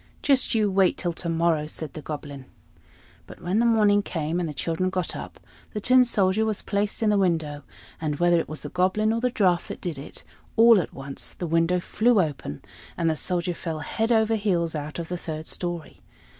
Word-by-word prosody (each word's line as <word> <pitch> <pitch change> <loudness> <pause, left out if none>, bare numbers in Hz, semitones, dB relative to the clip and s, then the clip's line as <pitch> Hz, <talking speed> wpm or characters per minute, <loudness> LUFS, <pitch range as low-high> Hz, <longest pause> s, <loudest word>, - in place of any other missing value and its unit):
"Just 270 -4 +3
you 210 -2 +2
wait 190 -1 +3
till 175 -2 -2
to 170 +1 -4
morrow!" 165 -2 +1
said 155 -1 -6
the 155 - -7
Goblin. 145 -3 -7 0.8
But - - -12
when 185 +5 0
the 235 - +3
morning 210 -3 +4
came, 165 -3 -2
and 170 -3 -2
the - - -3
children 165 +5 -1
got 185 -1 -2
up, - - -8 0.3
the 210 - -2
Tin 255 +4 +6
Soldier 200 -2 +2
was 215 -2 -1
placed 205 +2 -1
in 215 - +3
the 205 - +3
window; 160 -6 0 0.4
and 150 -2 -1
whether 175 +2 +3
it - - -4
was 155 - -6
the - - -6
Goblin 190 +5 +1
or 230 - -1
the 250 - +2
draught 185 -7 +1
that - - -7
did 165 -6 -4
it, 140 - -10 0.3
all 230 -2 +7
at - - -7
once 135 0 -7
the 175 - -5
window 165 +2 +2
flew 220 +5 +2
open, 145 - -3 0.3
and 165 -1 +2
the - - -1
Soldier 175 +2 -1
fell 160 -2 -5
head 225 +7 -1
over 220 -1 +3
heels 185 -6 0
out 150 -1 -5
of 170 -1 -4
the 180 - -3
third 160 -2 -6
story. 175 -2 -5
175 Hz, 210 wpm, -25 LUFS, 160-210 Hz, 0.8 s, all